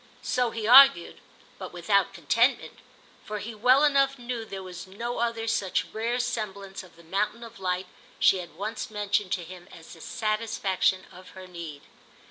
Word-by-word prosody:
So 250 -1 +1
he 225 -1 -5
argued, 255 -6 +7 0.4
but - - -7
without - - +1
contentment; - - +1 0.4
for 210 - -5
he 220 +3 -6
well 250 +6 +4
enough 275 -2 +3
knew 240 -2 -5
there 195 -3 -7
was 185 0 -9
no 235 +6 -5
other 230 -1 -1
such 200 -4 0
rare 230 +3 -1
semblance 210 -6 -4
of 180 -3 -17
the 170 - -17
mountain 210 +7 -2
of 230 -2 -12
light 185 0 -2 0.3
she 190 - +4
had 170 -3 -9
once 210 +6 -5
mentioned 205 -2 -1
to 180 - -2
him 180 +1 -11
as 165 -1 -13
the 165 - -14
satisfaction 215 -4 -1
of 185 +1 -14
her 185 - -9
need. 170 -5 -9
210 Hz, 170 wpm, -27 LUFS, 185-235 Hz, 0.4 s, argued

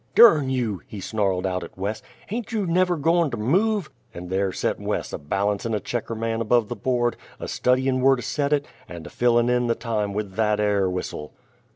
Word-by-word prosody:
"Durn 155 - +7
you!" 120 -7 -1
he 105 - -8
snarled 95 -2 -1
out 90 -1 -1
at - - -11
Wes, 100 +3 -3 0.2
"hain't 230 +2 -5
you 215 -3 0
never 180 0 +2
goern 165 +2 +2
to 120 - -4
move?" 190 - +1 0.2
And 90 +1 -7
there 95 0 +1
set - - -2
Wes, - - -3
a - - -3
balancin' 100 +8 -1
a - - 0
checker 115 +1 -4
man 115 0 -2
above 115 -1 +2
the 120 - -3
board, 120 +2 0 0.2
a - - -5
studyin' 130 +1 +1
whur 135 +1 +5
to 125 - -6
set 145 -1 -1
it, 145 -1 +2 0.2
and 85 -2 -8
a - - -9
fillin' 120 -1 +3
in 125 0 +2
the 115 - +1
time 110 -4 -2
with 105 -2 -3
that 105 -1 +2
air 100 -2 +2
whistle. 90 -4 -5
115 Hz, 210 wpm, -24 LUFS, 100-135 Hz, 0.2 s, Durn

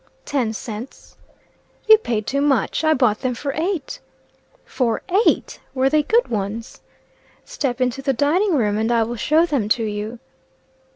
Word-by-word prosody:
"Ten 255 -6 -1
cents." 225 +2 -8 0.7
"You 440 0 +8
paid 220 - -2
too 280 +5 -1
much. 285 +1 +1
I 315 0 +4
bought 245 -5 +1
them 250 -1 -1
for 275 +3 -4
eight." 330 -1 -3 0.7
"For 235 -4 -1 0.2
eight! - - 0 0.2
Were 265 +1 +2
they 305 0 +4
good 455 +11 +2
ones?" 220 +2 -4 0.6
"Step 260 -3 -3
into 255 +1 -1
the 270 0 +1
dining 320 - +1
room, 210 -5 +1
and 225 +2 0
I 230 -1 +3
will 235 +2 -4
show 310 +8 +3
them 275 -11 -1
to 230 0 +2
you." 210 +2 -4
255 Hz, 160 wpm, -21 LUFS, 225-295 Hz, 0.7 s, You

